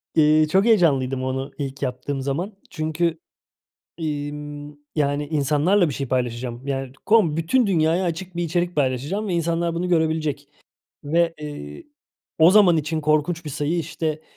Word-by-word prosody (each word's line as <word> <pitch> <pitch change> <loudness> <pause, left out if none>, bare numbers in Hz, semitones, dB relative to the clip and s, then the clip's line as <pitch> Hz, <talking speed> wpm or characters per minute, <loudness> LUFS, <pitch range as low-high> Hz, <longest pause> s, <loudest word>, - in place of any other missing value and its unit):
Iıı, 155 0 +5
çok 190 +7 +3
heyecanlıydım 135 - +3
onu 130 +1 -3
ilk 140 -1 -5
yaptığım 130 +2 -3
zaman. 160 +10 -3 0.2
Çünkü, 160 +1 -1 0.8
iii, 150 -3 -3
ımm, 145 0 -8 0.2
yani, 145 -1 0
insanlarla 155 +5 +2
bir 140 - -4
şey 135 -1 -4
paylaşacağım. 120 0 -2
Yani, 135 -2 -3
kom 195 -8 +4
bütün 215 +10 +2
dünyaya 170 -1 +2
açık 175 +1 -4
bir 175 - -1
içerik 175 +1 -1
paylaşacağım 145 - -1
ve 180 - -1
insanlar 170 0 0
bunu 175 +2 -2
görebilecek. 160 -4 0 0.6
Ve, 165 +2 +1
eee, 75 - -8 0.5
o 160 +2 +7
zaman 190 -4 +6
için 155 +1 -1
korkunç 155 +2 +1
bir 150 - -5
sayı, 150 +4 -1
işte, 155 -1 -3
155 Hz, 150 wpm, -23 LUFS, 140-170 Hz, 0.8 s, o